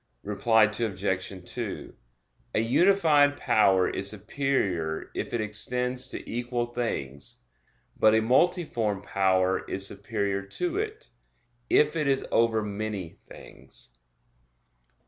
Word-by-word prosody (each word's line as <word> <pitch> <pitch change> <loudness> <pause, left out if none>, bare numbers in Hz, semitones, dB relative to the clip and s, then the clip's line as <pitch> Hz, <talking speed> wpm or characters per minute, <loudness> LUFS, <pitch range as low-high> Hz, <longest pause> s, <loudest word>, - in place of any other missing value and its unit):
Reply 110 +2 +3
Obj. 100 -3 -2
2: - - -5 0.6
A - - +3
unified 145 - +4
power 95 -3 +3
is 100 - -2
superior 100 - -2
if - - -4
it 120 - -1
extends 125 +4 0
to - - -7
equal 120 0 -2
things: 70 - -4 0.5
but 110 0 +4
a 110 - +4
multiform 120 - +1
power 95 -2 +1
is 95 0 -1
superior 100 -1 -2
to 340 - -3
it, 430 0 -5 0.6
if 150 +1 +4
it 155 -3 0
is 135 -1 +1
over 115 -1 +2
many 105 -4 -5
things. 65 0 -12
110 Hz, 110 wpm, -27 LUFS, 100-130 Hz, 0.6 s, unified